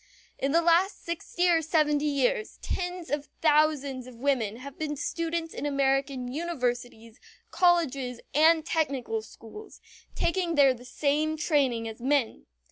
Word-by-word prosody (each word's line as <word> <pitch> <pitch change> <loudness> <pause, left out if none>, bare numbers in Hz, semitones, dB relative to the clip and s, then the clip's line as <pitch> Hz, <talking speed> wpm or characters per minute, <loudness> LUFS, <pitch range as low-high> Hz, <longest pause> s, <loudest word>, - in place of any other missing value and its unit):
In 275 - 0
the 335 +2 +3
last 345 +4 +2
sixty 345 +1 -1
or 335 -2 +4
seventy 300 -2 +1
years 430 - 0
tens 360 -2 -4
of 290 0 -2
thousands 295 -4 +2
of 255 - -11
women 235 -4 0
have 265 +3 -10
been 300 -1 -2
students 330 +2 -3
in - - -6
American 275 -2 0
universities, 245 -6 -4 0.3
colleges, 275 -9 +1
and 315 +2 +4
technical 270 -9 -1
schools, 230 - -13 0.4
taking 340 -1 0
there 275 -3 +6
the 245 0 -13
same 300 +4 0
training 270 -7 +1
as 225 +1 -8
men. 265 -2 0
290 Hz, 135 wpm, -27 LUFS, 255-330 Hz, 0.4 s, there